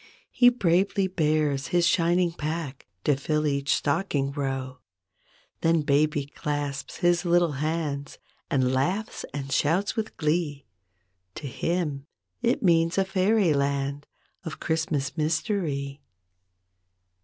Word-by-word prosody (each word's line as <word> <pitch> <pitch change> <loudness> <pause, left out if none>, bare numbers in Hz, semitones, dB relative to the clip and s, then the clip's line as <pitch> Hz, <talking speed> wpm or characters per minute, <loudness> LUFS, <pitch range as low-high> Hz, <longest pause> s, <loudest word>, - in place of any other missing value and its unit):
He 245 -1 +6
bravely 195 -3 +2
bears 155 -6 +1
his 175 +3 +2
shining 175 0 +3
pack 155 -4 -5 0.2
To 145 - +3
fill 150 +3 -1
each 140 -1 0
stocking 145 -3 0
row. 135 -2 -3 0.8
Then 165 -1 +3
baby 145 0 +2
clasps 145 -1 -4
his 175 0 +2
little 175 -2 +3
hands 155 -3 -2 0.3
And 130 -2 +2
laughs 180 +12 -1
and 135 -1 -5
shouts 165 - +1
with 220 -1 -4
glee. 150 -3 -1 0.7
To 150 - -7
him 150 -1 -2 0.3
it 240 0 +1
means 165 -1 +3
a 195 - +3
fairy 195 -2 +2
land 140 0 -1 0.4
Of 160 -3 -6
Christmas 155 -4 -1
mystery. 155 -3 -1
155 Hz, 115 wpm, -26 LUFS, 140-175 Hz, 0.8 s, He